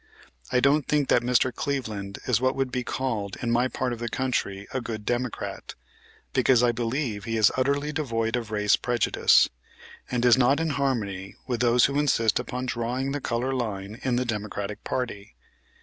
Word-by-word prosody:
I 125 - +3
don't 140 +2 +3
think 145 -2 +1
that 120 - +4
Mr. 125 +1 +2
Cleveland 110 -8 -3
is 120 -2 +2
what 130 +1 +2
would 135 -1 -1
be 125 -1 -2
called 110 -7 -3
in 120 -2 -1
my 120 +2 +3
part 125 -1 -2
of 115 - -7
the 120 0 -3
country 105 -6 -2
a 130 - -1
good 110 -3 -6
Democrat, 120 0 -3 0.6
because 125 -2 +4
I 120 - +4
believe 115 -3 -2
he 115 0 -1
is 110 -1 +5
utterly 140 +3 0
devoid 115 -7 -1
of 120 -3 -3
race 105 -1 +3
prejudice, 120 -2 +3 0.6
and 125 -1 0
is 120 +1 +6
not 135 +4 +4
in 165 -1 0
harmony 110 -9 -2
with 120 -3 -2
those 120 0 +5
who 140 +1 +1
insist 115 -7 +2
upon 125 +1 -4
drawing 125 +2 -2
the 145 0 -3
color 125 +3 -1
line 105 -4 -4
in 130 -2 0
the 125 +1 0
Democratic 105 -2 -4
party. 100 - -4
120 Hz, 180 wpm, -26 LUFS, 110-130 Hz, 0.6 s, is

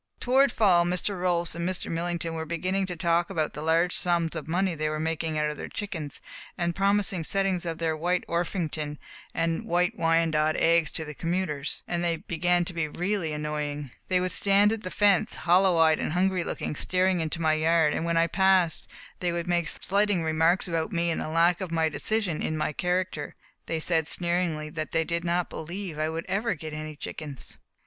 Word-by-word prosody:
Toward 265 +1 +4
fall 185 -7 +4
Mr. 180 +2 -1
Rolfs 175 -2 +1
and 170 +2 -2
Mr. 185 - -1
Millington 170 0 -2
were 160 0 -3
beginning 185 +4 -1
to 180 - -4
talk 170 0 +1
about 160 -5 -1
the 150 - -6
large 165 +3 +2
sums 170 -2 0
of 155 -2 -5
money 180 +2 +1
they 155 -1 -1
were 155 0 -3
making 160 0 -2
out 150 0 +1
of 150 - -8
their - - -6
chickens, 170 -9 -5 0.4
and 170 0 0
promising 195 -3 +2
settings 190 0 0
of 165 -1 -3
their 165 -1 0
White 175 +3 0
Orpington 165 -3 -2 0.4
and 165 0 0
White 175 +1 +1
Wyandotte 165 -2 +2
eggs 165 -2 +3
to 160 - -4
the 150 - -7
commuters, 165 -3 -2
and 175 0 -1
they 170 -1 +1
began 175 +2 +1
to 175 - -6
be 165 -2 -1
really 180 +1 -2
annoying. 150 -2 -3 0.2
They 185 -1 +2
would 180 0 -1
stand 200 +3 +4
at 225 - -4
the 185 - -5
fence, 200 -1 +2
hollow 180 0 +3
eyed 160 -1 +4
and - - -2
hungry 185 0 +1
looking, 150 - -4
staring 185 +2 +1
into 160 +1 -2
my 160 -1 +2
yard, 160 0 +3
and - - -2
when 170 0 0
I 165 - +5
passed 185 -1 +2 0.3
they 175 -1 0
would 170 0 -2
make 175 -2 +1
slighting 200 -2 +1
remarks 160 +4 +2
about 165 +2 -1
me 170 -2 +1
and - - -2
the - - -3
lack 170 +3 +3
of 185 - -3 0.2
decision 205 -3 -1
in 155 - -1
my 155 0 -1
character. 180 -3 -2 0.3
They 165 - -1
said 160 -1 +1
sneeringly 170 -4 -1
that 155 0 -5
they 165 - +2
did 170 +1 -2
not 175 0 0
believe 170 0 -6
I 155 0 0
would 165 +1 -4
ever 195 +2 0
get 155 0 -7
any 155 0 -6
chickens. 145 -3 -7
170 Hz, 200 wpm, -27 LUFS, 160-180 Hz, 0.4 s, I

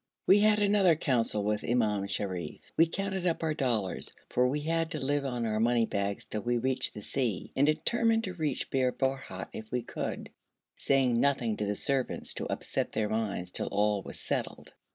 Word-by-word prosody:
We 200 - +6
had 210 0 +5
another 200 -4 +4
council 120 -8 0
with 105 +1 0
Imam 105 -4 +1
Sharif. 95 -5 -4
We 165 - +5
counted 190 +1 -2
up 165 -1 0
our 160 -1 +1
dollars, 115 - -1 0.2
for 125 0 +3
we 145 +3 -1
had 165 +1 0
to 155 - -3
live 140 +1 0
on 125 -3 -2
our 110 -1 0
money 115 0 +3
bags 100 -1 -2
till 105 - -4
we 120 +2 0
reached 130 +2 +1
the 105 - -7
sea, 120 -7 -2
and 140 +2 +3
determined 225 +8 +2
to 185 - -4
reach 155 -6 -2
Bir 130 -1 +2
Borhut 135 -9 -3
if 110 0 -8
we 125 -1 -1
could, - - -5 0.4
saying 130 -4 +2
nothing 125 -5 +2
to 105 - -1
the 105 - 0
servants 135 +3 -1
to - - -4
upset - - -2
their 105 -1 0
minds 100 -5 -2
till - - -1
all 105 0 +1
was - - -7
settled. - - -3
125 Hz, 195 wpm, -30 LUFS, 105-155 Hz, 0.4 s, We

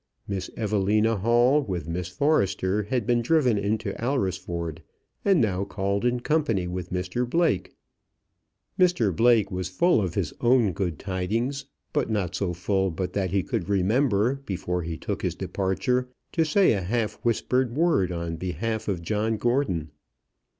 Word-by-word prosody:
Miss 95 -2 -3
Evelina 105 +1 +2
Hall 120 +7 +4
with 90 - -4
Miss 85 +1 -3
Forrester 100 - +1
had 110 +2 -2
been 120 +1 +2
driven 125 -5 +3
into 105 0 -1
Alresford, 90 - -2 0.4
and 195 -4 +4
now 100 -5 +1
called 100 +2 -2
in 125 0 +1
company 120 - +1
with 90 0 -5
Mr 90 +7 -2
Blake. 165 - +1 1.0
Mr 175 - +3
Blake 115 -1 +4
was 90 -2 -3
full 115 - +3
of 90 -4 -3
his 90 -7 -1
own 120 -4 +4
good 90 -5 -2
tidings, 110 +9 -2 0.3
but - - 0
not 100 -6 -1
so 90 0 -1
full 95 +2 0
but 90 +2 -4
that 95 -2 0
he 95 +1 +1
could 85 - -3
remember, 110 +5 +2
before 90 -2 -2
he 80 -1 -4
took - - -4
his - - -1
departure, 125 +7 -1 0.2
to 165 -2 +2
say 185 - +4
a 100 - -1
half 105 +3 -2
whispered 120 +1 +1
word 150 - +2
on 85 -1 -3
behalf 95 +6 -3
of 90 -5 -2
John 110 +4 0
Gordon. 105 - 0
100 Hz, 155 wpm, -26 LUFS, 90-120 Hz, 1.0 s, Hall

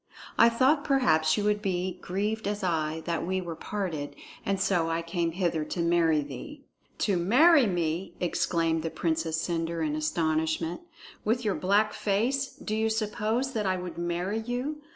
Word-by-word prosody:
I 230 - +7
thought 265 +5 +3
perhaps 160 - +3
you 210 - 0
would 210 0 +1
be 185 -2 -2
grieved 210 +4 -2
as 205 -1 -2
I 160 -2 -1
that 170 -1 -1
we 185 +2 -1
were 170 -3 -5
parted, 165 -7 -4 0.3
and 195 -1 -1
so 175 -4 +1
I 165 +1 -1
came 170 -1 -1
hither 170 -3 0
to 175 - -5
marry 170 -2 +3
thee." 145 - -8 0.4
"To 200 -4 +2
marry 260 - +5
me!" 175 -1 -2
exclaimed 165 -2 0
the 165 - -2
Princess 160 -1 -1
Cendre 165 -1 -1
in 150 0 -1
astonishment. 160 - 0 0.4
"With 230 +2 0
your 205 - +2
black 205 +3 +2
face, 240 +7 0
do 215 - -4
you 220 0 +1
suppose 220 +4 -1
that 210 -3 -1
I 185 0 +1
would 180 -1 -6
marry 175 +5 -1
you? 250 +6 -3
185 Hz, 170 wpm, -28 LUFS, 165-215 Hz, 0.4 s, I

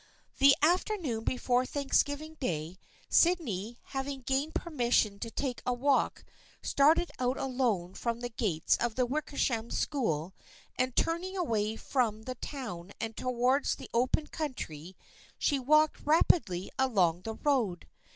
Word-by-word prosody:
The 275 0 +7
afternoon 335 - +1
before 250 0 +1
Thanksgiving 285 +3 0
Day, 170 - -3 0.3
Sydney, 240 - +2
having 270 0 -4
gained 270 +5 -1
permission 240 - +1
to 230 - -4
take 255 +1 -3
a 250 - 0
walk, 275 +2 +1 0.4
started 310 +5 +3
out 255 +1 0
alone 240 -9 -1
from 235 +2 -2
the 245 0 -4
gates 200 -9 +1
of 235 -2 -1
the 255 - +2
Wickersham 255 -4 -1
School 185 - -1 0.4
and 255 0 -1
turning 360 +4 0
away 220 - 0
from 225 -3 -1
the 255 - -4
town 220 - -7
and 225 -1 -4
towards 255 +2 +1
the - - -11
open 255 +6 +2
country, 190 - -6 0.4
she 285 -3 +1
walked 305 +4 +3
rapidly 290 - +2
along 185 -10 +2
the 220 +3 -5
road. 235 - 0
250 Hz, 130 wpm, -30 LUFS, 220-285 Hz, 0.4 s, The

